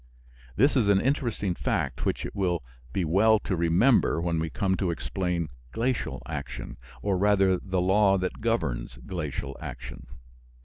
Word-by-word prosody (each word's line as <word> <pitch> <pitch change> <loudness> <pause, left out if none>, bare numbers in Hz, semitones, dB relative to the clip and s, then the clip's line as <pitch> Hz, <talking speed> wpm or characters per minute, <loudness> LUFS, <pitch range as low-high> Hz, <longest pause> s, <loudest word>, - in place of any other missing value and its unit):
This 140 +7 +4
is 120 -6 +3
an 100 -1 +5
interesting 120 -7 0
fact - - -1
which - - -1
it - - -7
will 90 -6 0 0.3
be 90 +5 0
well 105 +7 +4
to 95 - -1
remember 85 +6 +3
when 85 -1 0
we 80 0 -1
come 95 +4 0
to 95 - 0
explain 85 -1 -2 0.2
glacial 115 - -2
action, - - -6 0.3
or 100 -3 +1
rather 95 -2 +3
the 95 -2 -1
law 95 +1 +4
that 95 +3 -3
governs 65 - -1
glacial 75 -5 -4
action. - - -8
95 Hz, 150 wpm, -27 LUFS, 85-105 Hz, 0.3 s, an